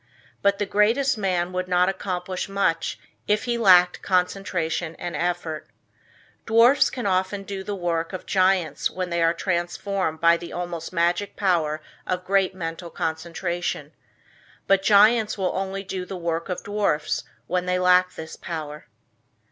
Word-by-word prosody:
But 200 0 +3
the 205 - -1
greatest 230 +8 +2
man 185 -4 -1
would 185 0 -2
not 180 0 +3
accomplish 185 -1 -3
much 195 -4 0 0.3
if 210 0 +2
he 240 -1 -1
lacked 180 -6 +5
concentration 180 -3 -1
and 175 - -5
effort. 175 -3 -3 0.8
Dwarfs 230 +5 +5
can 250 -4 -5
often 190 +1 0
do 195 -1 -6
the 205 +1 -4
work 170 -3 -2
of 185 - -6
giants 185 -6 +2
when 185 -1 -4
they 170 0 0
are 165 +1 +3
transformed 175 -1 -2
by 170 +1 +5
the 170 0 -9
almost 175 -2 -5
magic 175 +3 0
power 160 -6 +1 0.3
of 180 0 -2
great 195 -1 +2
mental 170 0 -5
concentration. 170 +2 -3 0.7
But 195 -1 +3
giants 215 +2 +5
will 190 -2 -1
only 195 +1 -3
do 185 -1 -4
the 185 +1 -6
work 170 0 -3
of 180 - -4
dwarfs 205 -7 0 0.2
when 180 0 -1
they 180 0 +1
lack 180 0 +4
this 160 0 -8
power. 150 -2 -7
180 Hz, 150 wpm, -24 LUFS, 170-195 Hz, 0.8 s, lacked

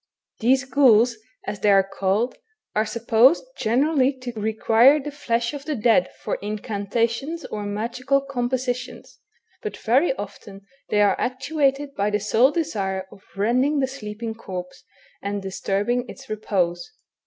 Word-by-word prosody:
These 260 +4 +3
ghouls, 250 -4 +4 0.3
as 205 - -4
they 205 +1 +2
are 195 -1 +6
called, 195 +6 -1 0.3
are 215 +1 +1
supposed 235 +6 +4
generally 265 +4 +2
to 250 -1 -4
require 225 +5 +4
the 295 +1 -6
flesh 235 -3 -1
of 285 -1 -7
the 305 - -2
dead 220 -5 +3
for - - -2
incantations 225 - -2
or 210 -1 -5
magical 240 +6 0
compositions, 250 -2 -3 0.4
but 430 - -5
very 260 +9 +2
often 200 -2 -9 0.2
they 210 - +3
are 200 -2 +4
actuated 275 +2 0
by 200 -2 0
the 210 0 0
sole 220 +5 +4
desire 195 - -2
of 195 - -15
rending 250 +9 +2
the 265 - +2
sleeping 225 -4 -6
corpse, 185 -5 -8 0.4
and 200 0 -3
disturbing 205 +6 -1
its 270 0 -11
repose. 180 -3 -1
230 Hz, 140 wpm, -23 LUFS, 205-265 Hz, 0.4 s, are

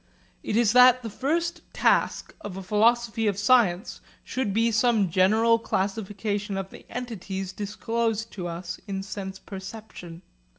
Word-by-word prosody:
It 210 - -1
is 230 -2 +3
that 250 0 +7
the 225 - -5
first 335 +9 -1
task - - +1
of 195 -2 -7
a 195 - -6
philosophy 225 +3 +2
of 200 -2 0
science 205 -3 +2 0.2
should 255 -5 -2
be 230 +3 +2
some 215 -4 +2
general 220 +6 +4
classification 205 0 -2
of 195 0 -5
the - - -13
entities 195 -6 -5
disclosed 225 +2 -2
to 180 -3 -5
us 170 +1 -6
in 195 -1 -3
sense 190 -1 -6
perception. 190 -3 -9
210 Hz, 140 wpm, -26 LUFS, 195-230 Hz, 0.2 s, that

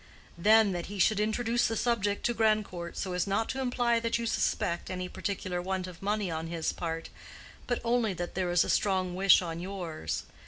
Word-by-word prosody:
Then, 215 +2 +5
that 175 -2 -3
he 205 - -7
should 210 +2 +3
introduce 230 +2 +1
the 225 - -2
subject 205 -3 0
to 240 - +2
Grandcourt 215 -6 0
so 185 -2 -3
as 180 +2 0
not 200 +3 0
to 265 - -2
imply 245 -2 +1
that 230 0 0
you 235 - -3
suspect 170 -5 0
any 180 -1 -3
particular 185 -2 -3
want 190 0 -2
of 180 -2 -10
money 205 -2 -1
on 160 0 -3
his 165 -1 -2
part, 165 -1 -4 0.6
but 245 - 0
only 230 -4 +1
that 175 0 -4
there 185 -1 -1
is 175 0 +4
a - - -5
strong 185 -3 +1
wish 190 0 +5
on 165 -1 -4
yours. 170 - -4
195 Hz, 200 wpm, -30 LUFS, 175-220 Hz, 0.6 s, Then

